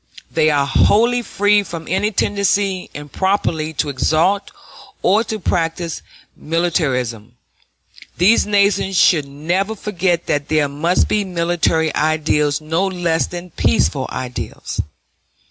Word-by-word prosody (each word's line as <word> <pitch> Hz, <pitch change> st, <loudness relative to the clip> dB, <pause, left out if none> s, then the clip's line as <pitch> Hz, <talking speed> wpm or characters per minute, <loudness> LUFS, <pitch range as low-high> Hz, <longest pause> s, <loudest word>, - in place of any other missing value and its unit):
They 155 Hz, -, +2 dB
are 145 Hz, -2 st, +2 dB
wholly 235 Hz, +11 st, +3 dB
free 205 Hz, -1 st, +2 dB
from 165 Hz, -4 st, -8 dB
any 190 Hz, +4 st, 0 dB
tendency 200 Hz, -2 st, 0 dB
improperly 160 Hz, +1 st, -1 dB
to 150 Hz, 0 st, -1 dB
exalt 165 Hz, +9 st, +1 dB, 0.5 s
or 205 Hz, +5 st, +3 dB
to 215 Hz, +1 st, -3 dB
practice 165 Hz, -2 st, -2 dB, 0.3 s
militarism. 130 Hz, -9 st, -1 dB, 0.8 s
These 200 Hz, +7 st, +4 dB
nations 200 Hz, -2 st, +2 dB
should 160 Hz, -6 st, +4 dB
never 175 Hz, +9 st, -2 dB
forget 185 Hz, -4 st, -1 dB
that 145 Hz, 0 st, -1 dB
there 155 Hz, -2 st, +2 dB
must 155 Hz, +6 st, +1 dB
be 210 Hz, -, +1 dB
military 170 Hz, -3 st, 0 dB
ideals 150 Hz, -1 st, +1 dB
no 165 Hz, +5 st, 0 dB
less 170 Hz, -6 st, 0 dB
than 175 Hz, 0 st, -8 dB
peaceful 80 Hz, -, +1 dB
ideals. 125 Hz, -1 st, -5 dB
170 Hz, 115 wpm, -18 LUFS, 150-195 Hz, 0.8 s, These